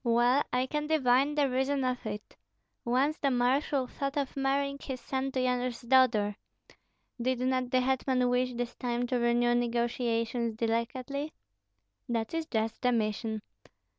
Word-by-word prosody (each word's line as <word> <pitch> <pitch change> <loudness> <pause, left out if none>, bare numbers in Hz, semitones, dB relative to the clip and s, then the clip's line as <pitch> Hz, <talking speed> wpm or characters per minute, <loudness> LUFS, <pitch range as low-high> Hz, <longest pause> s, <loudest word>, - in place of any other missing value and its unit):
Well, 240 +3 +4
I 250 +1 +1
can 300 +2 -2
divine 280 -1 +3
the 290 -2 +3
reason 265 +2 0
of 255 -3 -2
it. 210 0 -6 0.5
Once 265 +6 +1
the 280 - +2
marshal 260 +2 +1
thought 275 +3 -4
of 280 -2 -2
marrying 280 +1 0
his 260 -2 -5
son 265 +1 -2
to 260 - 0
Yanush's 250 -1 0
daughter. 235 -5 +3 0.8
Did 255 +1 +1
not 255 -1 0
the 255 0 +3
hetman 260 -1 +1
wish 250 0 +1
this 245 0 -3
time 245 0 -1
to 245 0 0
renew 240 0 +3
negotiations 235 -1 0
delicately?" 245 +6 -2 0.8
"That 230 +1 -1
is 325 -1 -2
just 225 -4 -2
the 250 - +3
mission." 220 -1 -1
250 Hz, 150 wpm, -30 LUFS, 235-270 Hz, 0.8 s, Well